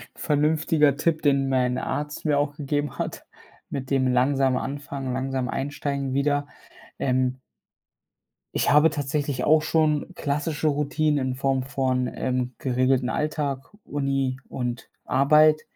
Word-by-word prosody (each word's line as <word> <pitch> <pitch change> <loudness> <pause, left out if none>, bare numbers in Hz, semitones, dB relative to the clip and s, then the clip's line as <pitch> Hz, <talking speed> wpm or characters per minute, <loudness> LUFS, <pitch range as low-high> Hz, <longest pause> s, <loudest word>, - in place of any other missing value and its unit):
vernünftiger 150 -1 +2
Tipp, 155 +1 0
den 140 -2 +2
mein 125 -1 +1
Arzt 150 +3 -3
mir 145 -2 +3
auch 145 0 -1
gegeben 145 0 -2
hat, - - -4 0.4
mit 130 -1 -5
dem 135 -2 +2
langsam 130 +1 +2
anfangen, 135 -1 -4
langsam 130 -1 -2
einsteigen 140 -1 -3
wieder. 145 +1 +1 0.5
Ähm 130 0 0 1.2
ich - - +1
habe 150 +2 +6
tatsächlich 145 -1 -2
auch 155 0 +5
schon 155 -1 +1
klassische 150 +2 -1
Routinen 150 -1 +1
in 130 - -2
Form 135 -1 0
von, 130 -2 0
ähm, 125 -1 -2
geregelten 130 0 +1
Alltag, 145 -3 -2 0.2
Uni 135 -2 -1
und 125 -1 -4 0.2
Arbeit. 155 +3 +5
140 Hz, 125 wpm, -25 LUFS, 130-150 Hz, 1.2 s, habe